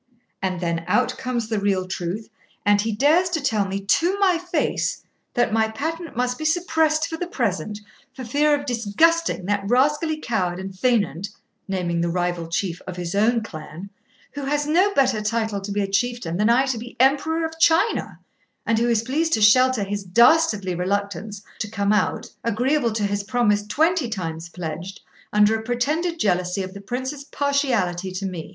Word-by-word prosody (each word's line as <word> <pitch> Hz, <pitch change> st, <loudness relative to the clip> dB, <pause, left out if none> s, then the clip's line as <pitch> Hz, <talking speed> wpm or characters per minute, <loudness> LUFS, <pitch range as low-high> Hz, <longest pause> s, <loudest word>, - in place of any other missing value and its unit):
And 185 Hz, -2 st, -1 dB
then 170 Hz, -1 st, -1 dB
out 250 Hz, 0 st, +2 dB
comes 245 Hz, -3 st, -2 dB
the 220 Hz, -2 st, -1 dB
real 195 Hz, -2 st, 0 dB
truth; 185 Hz, +4 st, -4 dB, 0.4 s
and 205 Hz, 0 st, +4 dB
he 225 Hz, +1 st, -1 dB
dares 300 Hz, -, +3 dB
to 340 Hz, -2 st, -1 dB
tell 220 Hz, -8 st, 0 dB
me 195 Hz, +1 st, -3 dB
to 340 Hz, -, +2 dB
my 375 Hz, -4 st, +3 dB
face 355 Hz, +1 st, -1 dB, 0.3 s
that 240 Hz, -2 st, +2 dB
my 220 Hz, 0 st, +3 dB
patent 325 Hz, +6 st, -5 dB
must 250 Hz, 0 st, -1 dB
be -, -, -4 dB
suppressed 320 Hz, -2 st, +2 dB
for 325 Hz, -, -5 dB
the 355 Hz, -, -3 dB
present, 210 Hz, -, -2 dB, 0.4 s
for 260 Hz, -, -7 dB
fear 290 Hz, +5 st, +3 dB
of 285 Hz, -, -8 dB
disgusting 245 Hz, -, +1 dB
that 205 Hz, +1 st, 0 dB
rascally 295 Hz, +5 st, +2 dB
coward 185 Hz, -, -1 dB
and 190 Hz, 0 st, -6 dB
faineant 200 Hz, -4 st, 0 dB, 0.4 s
(naming 175 Hz, -3 st, -1 dB
the 170 Hz, -, 0 dB
rival 175 Hz, -1 st, -1 dB
chief 175 Hz, 0 st, -2 dB
of 185 Hz, -1 st, -6 dB
his 175 Hz, -1 st, -4 dB
own 225 Hz, +3 st, +2 dB
clan), 175 Hz, 0 st, -9 dB, 0.4 s
who 285 Hz, -1 st, -6 dB
has 295 Hz, +1 st, 0 dB
no 360 Hz, +7 st, +3 dB
better 255 Hz, -5 st, +3 dB
title 220 Hz, -1 st, -1 dB
to 200 Hz, +1 st, -6 dB
be 205 Hz, +1 st, 0 dB
a 200 Hz, -, -1 dB
chieftain 235 Hz, -3 st, -1 dB
than 210 Hz, +3 st, +2 dB
I 250 Hz, +3 st, +4 dB
to 260 Hz, -4 st, -2 dB
be 240 Hz, +2 st, -10 dB
Emperor 305 Hz, +5 st, +2 dB
of 320 Hz, 0 st, -7 dB
China, 330 Hz, +7 st, +2 dB, 0.5 s
and 225 Hz, -1 st, +2 dB
who 240 Hz, +1 st, +1 dB
is 230 Hz, -2 st, +2 dB
pleased 315 Hz, +7 st, 0 dB
to 220 Hz, -, +2 dB
shelter 255 Hz, +1 st, +5 dB
his 200 Hz, 0 st, -3 dB
dastardly 210 Hz, -, +4 dB
reluctance 200 Hz, +2 st, -3 dB, 0.2 s
to 215 Hz, -, -3 dB
come 200 Hz, -1 st, 0 dB
out, 210 Hz, -, 0 dB, 0.2 s
agreeable 245 Hz, +3 st, +1 dB
to 215 Hz, -1 st, -1 dB
his 200 Hz, 0 st, -1 dB
promise 210 Hz, -1 st, +1 dB
twenty 320 Hz, -, +1 dB
times 165 Hz, -5 st, -5 dB
pledged, 175 Hz, +2 st, -6 dB, 0.3 s
under 210 Hz, +1 st, +4 dB
a 220 Hz, -, -1 dB
pretended 295 Hz, +9 st, -1 dB
jealousy 180 Hz, -, 0 dB
of 185 Hz, 0 st, -7 dB
the 200 Hz, -, -9 dB
Prince's 260 Hz, +7 st, -4 dB
partiality 245 Hz, -12 st, 0 dB
to 190 Hz, +1 st, -4 dB
me. 180 Hz, -4 st, -5 dB
220 Hz, 185 wpm, -23 LUFS, 195-280 Hz, 0.5 s, shelter